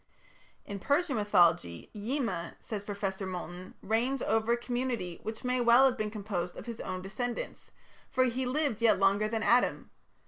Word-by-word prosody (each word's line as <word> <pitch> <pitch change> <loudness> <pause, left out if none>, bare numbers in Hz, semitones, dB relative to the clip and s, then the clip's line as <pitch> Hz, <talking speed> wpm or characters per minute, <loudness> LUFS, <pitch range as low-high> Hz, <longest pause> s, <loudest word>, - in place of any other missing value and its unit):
In 200 -1 -6
Persian 285 - +1
mythology 170 - +2
"Yima", 210 -6 -2
says 210 -3 -5
Professor 200 -2 -3
Moulton, 180 0 -7
"reigns 240 +5 0
over 225 +2 +2
a - - +1
community 240 -7 -3
which 220 0 -6
may 250 0 +1
well 240 +2 +7
have 260 -2 +3
been 215 -3 -2
composed 200 -5 -4
of - - -8
his 235 -2 -6
own 185 0 -4
descendants, 235 +5 -4 0.4
for 260 -2 +3
he 255 +1 0
lived 270 -4 0
yet 230 - +5
longer 195 +2 +3
than 220 0 -2
Adam. 240 +3 +2
220 Hz, 165 wpm, -30 LUFS, 195-245 Hz, 0.4 s, well